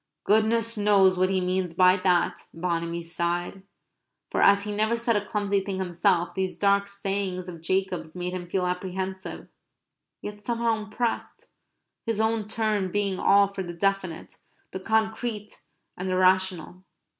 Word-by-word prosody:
"Goodness 225 Hz, +1 st, +2 dB
knows 200 Hz, -2 st, +4 dB
what 185 Hz, +1 st, +2 dB
he 190 Hz, -1 st, +1 dB
means 180 Hz, -2 st, -1 dB
by 185 Hz, +1 st, +6 dB
that," 180 Hz, -2 st, +1 dB
Bonamy 170 Hz, 0 st, -2 dB
sighed. 175 Hz, +3 st, -2 dB, 0.7 s
For -, -, 0 dB
as 200 Hz, 0 st, +5 dB
he 210 Hz, 0 st, -4 dB
never 220 Hz, +3 st, +1 dB
said 230 Hz, -1 st, +1 dB
a 205 Hz, -, +1 dB
clumsy 205 Hz, -1 st, 0 dB
thing 195 Hz, 0 st, -4 dB
himself, 175 Hz, -1 st, +1 dB
these 190 Hz, -1 st, -2 dB
dark 200 Hz, 0 st, +2 dB
sayings 195 Hz, -2 st, -3 dB
of 170 Hz, -3 st, -8 dB
Jacob's 180 Hz, -2 st, -2 dB
made 180 Hz, 0 st, -3 dB
him 175 Hz, -1 st, -6 dB
feel 185 Hz, 0 st, 0 dB
apprehensive, 190 Hz, +1 st, -4 dB, 0.7 s
yet 205 Hz, 0 st, -8 dB
somehow 230 Hz, 0 st, 0 dB
impressed, 220 Hz, +2 st, -4 dB, 0.5 s
his 225 Hz, -2 st, -2 dB
own 220 Hz, -1 st, +1 dB
turn 210 Hz, -3 st, -1 dB
being 200 Hz, -1 st, -1 dB
all 200 Hz, 0 st, +5 dB
for 195 Hz, 0 st, -6 dB
the 175 Hz, -2 st, -5 dB
definite, 190 Hz, -2 st, -2 dB, 0.3 s
the 190 Hz, -, -5 dB
concrete, 220 Hz, +1 st, -2 dB, 0.3 s
and 185 Hz, +1 st, -4 dB
the 185 Hz, -, 0 dB
rational. 185 Hz, -1 st, +1 dB
190 Hz, 150 wpm, -26 LUFS, 180-210 Hz, 0.7 s, by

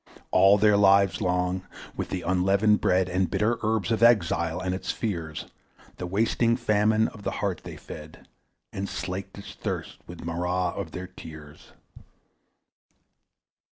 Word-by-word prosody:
All 95 Hz, +2 st, +6 dB
their 105 Hz, 0 st, +4 dB
lives 100 Hz, -2 st, +4 dB
long, 90 Hz, +1 st, 0 dB, 0.3 s
with -, -, -4 dB
the 90 Hz, -2 st, -3 dB
unleavened 95 Hz, +4 st, +2 dB
bread 90 Hz, 0 st, +2 dB
And 90 Hz, +1 st, 0 dB
bitter 115 Hz, +3 st, 0 dB
herbs 110 Hz, -3 st, 0 dB
of 115 Hz, -, 0 dB
exile 85 Hz, -7 st, +3 dB
and 90 Hz, 0 st, -2 dB
its 95 Hz, -, -5 dB
fears, 85 Hz, -8 st, -4 dB, 0.5 s
The 90 Hz, -, -5 dB
wasting 115 Hz, +4 st, +1 dB
famine 110 Hz, -1 st, +2 dB
of 110 Hz, -, -13 dB
the -, -, -2 dB
heart -, -, -2 dB
they -, -, -8 dB
fed, -, -, -11 dB, 0.5 s
And 100 Hz, +1 st, -4 dB
slaked 90 Hz, +4 st, -5 dB
its 100 Hz, -, -9 dB
thirst -, -, -5 dB
with 85 Hz, -1 st, -9 dB
marah 90 Hz, +2 st, -1 dB
of 80 Hz, -, -5 dB
their 90 Hz, +3 st, -6 dB
tears. 80 Hz, -4 st, -12 dB
95 Hz, 145 wpm, -26 LUFS, 90-105 Hz, 0.5 s, All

